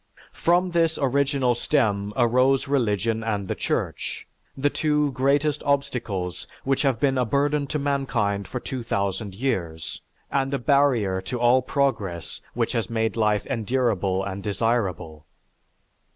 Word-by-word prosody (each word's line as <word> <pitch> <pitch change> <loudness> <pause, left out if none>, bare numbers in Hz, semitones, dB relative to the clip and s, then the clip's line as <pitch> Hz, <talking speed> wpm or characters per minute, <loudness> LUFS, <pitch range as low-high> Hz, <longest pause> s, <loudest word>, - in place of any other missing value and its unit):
From 175 +2 +2
this 165 -2 +2
original 135 -1 +2
stem 105 -6 0
arose 130 +3 +3
religion 115 -4 0
and 105 -3 -2
the - - -1
Church, - - -3 0.3
the 145 +2 +1
two 150 -2 +1
greatest 145 +3 +1
obstacles 120 -10 -2 0.2
which 135 0 +1
have 135 -5 +1
been 135 -2 +2
a - - +3
burden 140 +4 +1
to 150 - -2
mankind 130 -8 -1
for 125 - -4
2000 100 -6 -3
years 85 - -3 0.3
and 135 0 0
a - - +1
barrier 125 -9 +2
to 120 +6 -4
all 120 +2 +5
progress 110 -11 -2
which - - 0
has 115 - -1
made 110 -1 0
life 105 -2 +1
endurable 110 -6 0
and 100 0 -4
desirable. 100 -8 -1
120 Hz, 135 wpm, -24 LUFS, 100-140 Hz, 0.3 s, all